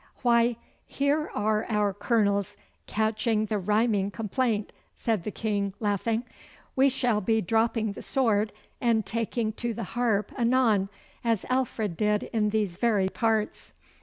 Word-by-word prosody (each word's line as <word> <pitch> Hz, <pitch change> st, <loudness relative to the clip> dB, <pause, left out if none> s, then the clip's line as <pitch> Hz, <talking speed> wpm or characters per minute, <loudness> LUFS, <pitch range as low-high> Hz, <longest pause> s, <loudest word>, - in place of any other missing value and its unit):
'Why, 235 Hz, -1 st, +4 dB, 0.3 s
here 290 Hz, +2 st, 0 dB
are 215 Hz, +1 st, +1 dB
our 210 Hz, -2 st, +1 dB
Colonels 205 Hz, -1 st, +1 dB, 0.3 s
catching 220 Hz, 0 st, +1 dB
the 210 Hz, -1 st, -1 dB
rhyming 210 Hz, 0 st, +1 dB
complaint,' 220 Hz, +1 st, -1 dB, 0.2 s
said 220 Hz, -6 st, -1 dB
the -, -, -1 dB
King, 200 Hz, -3 st, -2 dB
laughing. 220 Hz, +2 st, 0 dB, 0.5 s
'We 270 Hz, +1 st, +5 dB
shall 245 Hz, -5 st, +1 dB
be 220 Hz, +3 st, +2 dB
dropping 225 Hz, +2 st, +1 dB
the -, -, -9 dB
sword 220 Hz, -6 st, +1 dB, 0.3 s
and 230 Hz, -3 st, +2 dB
taking 230 Hz, -1 st, -1 dB
to 235 Hz, -2 st, -1 dB
the 230 Hz, -, -4 dB
harp 230 Hz, -4 st, +1 dB
anon, 235 Hz, -5 st, +2 dB, 0.3 s
as 230 Hz, -4 st, 0 dB
Alfred 225 Hz, -8 st, -1 dB
did 210 Hz, -1 st, +1 dB
in 215 Hz, -2 st, +2 dB
these 205 Hz, -5 st, -1 dB
very 205 Hz, -4 st, +2 dB
parts. 220 Hz, 0 st, -1 dB
220 Hz, 135 wpm, -27 LUFS, 205-235 Hz, 0.5 s, We